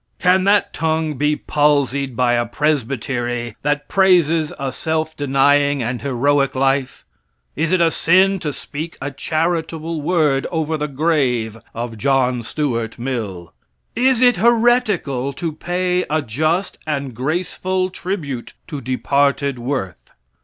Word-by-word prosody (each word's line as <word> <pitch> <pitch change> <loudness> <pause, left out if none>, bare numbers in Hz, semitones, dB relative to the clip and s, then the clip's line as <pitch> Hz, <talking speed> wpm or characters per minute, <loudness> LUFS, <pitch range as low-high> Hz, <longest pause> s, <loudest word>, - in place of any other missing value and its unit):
Can 185 +1 +3
that 205 +1 +3
tongue 160 -1 0
be 150 +2 +1
palsied 140 -3 +1
by 120 0 +2
a 120 0 +1
presbytery 120 -5 -2
that 145 0 -1
praises 170 -5 +3
a 135 -1 -3
self 160 +2 -2
denying 145 0 +2
and 120 +1 -3
heroic 140 +1 +1
life? 135 0 0 0.5
Is 165 +3 0
it 185 -2 +3
a 165 -1 +4
sin 190 +4 +3
to 150 -3 -3
speak 155 +4 -7
a 145 +1 -4
charitable 160 +2 -2
word 150 -4 +1
over 160 -2 -1
the 150 -1 -2
grave 135 -7 0 0.2
of 115 -1 -5
John 130 -1 +2
Stuart 115 -2 -2
Mill? 110 -9 -4 0.4
Is 255 +1 +3
it 245 -1 +5
heretical 220 - +2
to 165 +2 -3
pay 180 +3 -1
a 155 0 0
just 155 - -1
and 140 -4 -2
graceful 185 +7 -2
tribute 155 -10 -5 0.2
to 145 -4 -5
departed 140 +1 0
worth? 120 -8 -4
145 Hz, 130 wpm, -19 LUFS, 130-165 Hz, 0.5 s, it